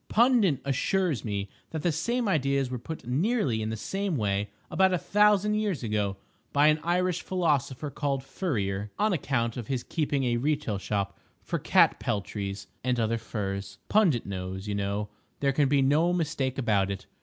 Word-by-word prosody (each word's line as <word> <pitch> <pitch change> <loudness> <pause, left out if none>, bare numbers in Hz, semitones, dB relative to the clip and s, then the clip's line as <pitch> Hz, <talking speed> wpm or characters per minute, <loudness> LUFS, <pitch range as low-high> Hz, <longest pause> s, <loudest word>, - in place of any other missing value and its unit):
Pundit 230 - +4
assures 145 - 0
me 100 -2 -2 0.2
that 160 -2 -4
the 175 - +3
same 235 +10 -1
ideas 140 -6 +1
were 125 - -3
put 160 +7 -7
nearly 140 - +1
in 110 - -2
the 110 - -3
same 195 - -2
way, 100 -2 0 0.2
about 190 0 +4
a 180 - +2
thousand 210 +3 +3
years 210 -10 -1
ago, 105 -3 -1 0.3
by 145 +2 +5
an 155 +1 +3
Irish 180 +1 +1
philosopher 150 -6 0
called 140 -2 -1
Furrier, 105 - -2
on 210 -1 +2
account 125 -7 -1
of 120 -3 -5
his 130 -3 -2
keeping 145 -4 -1
a 120 -2 +1
retail 140 -6 0
shop 100 0 -2 0.2
for - - -2
cat - - +4
peltries 100 -1 -3 0.2
and 125 -1 +1
other 115 0 +1
furs. 100 -3 -4
Pundit 180 - +3
knows, 95 0 -5
you 105 - -1
know; 100 +1 -2 0.3
there 140 -1 +2
can 140 0 +3
be 140 -1 +4
no 155 +6 +3
mistake 150 -6 -1
about 105 -7 +2
it. 100 -1 -5
135 Hz, 175 wpm, -28 LUFS, 105-175 Hz, 0.3 s, by